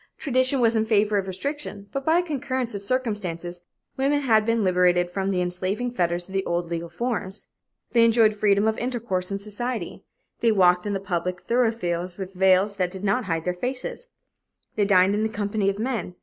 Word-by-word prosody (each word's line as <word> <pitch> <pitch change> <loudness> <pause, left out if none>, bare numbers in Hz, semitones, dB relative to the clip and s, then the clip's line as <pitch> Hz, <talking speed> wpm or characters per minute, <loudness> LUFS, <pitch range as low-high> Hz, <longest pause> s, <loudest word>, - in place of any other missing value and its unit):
Tradition 260 -1 +1
was 230 -1 +3
in 220 - +3
favor 210 -2 +2
of 190 - -4
restriction, 205 0 -4
but 275 - -3
by 320 +4 +3
a 355 - +2
concurrence 260 -6 -3
of 200 - -5
circumstances, 200 -7 -3 0.4
women 280 +2 +2
had 220 -5 +3
been 230 -1 +2
liberated 180 -1 +3
from 195 +1 -2
the 185 -2 0
enslaving 185 +7 -2
fetters 175 -5 -1
of 190 - -12
the 195 0 0
old 175 -1 -2
legal 170 0 -3
forms. 210 0 -4 0.4
They 235 -1 +5
enjoyed 225 -1 +5
freedom 205 0 +2
of 220 - 0
intercourse 235 -7 -2
in 195 - -2
society. 210 0 -5 0.4
They 230 - +3
walked 180 -1 +4
in 205 - -1
the 195 - -1
public 180 -1 -2
thoroughfares 185 -8 -1
with 190 -1 -6
veils 190 +2 +3
that 180 -2 +1
did 190 +1 -8
not 205 +5 +1
hide 165 -3 -1
their 180 - 0
faces. 255 - -5 0.7
They 205 - +2
dined 190 0 +4
in 210 - 0
the 220 - 0
company 205 -1 -1
of 200 - -2
men. 220 -6 -3
205 Hz, 195 wpm, -24 LUFS, 180-235 Hz, 0.7 s, They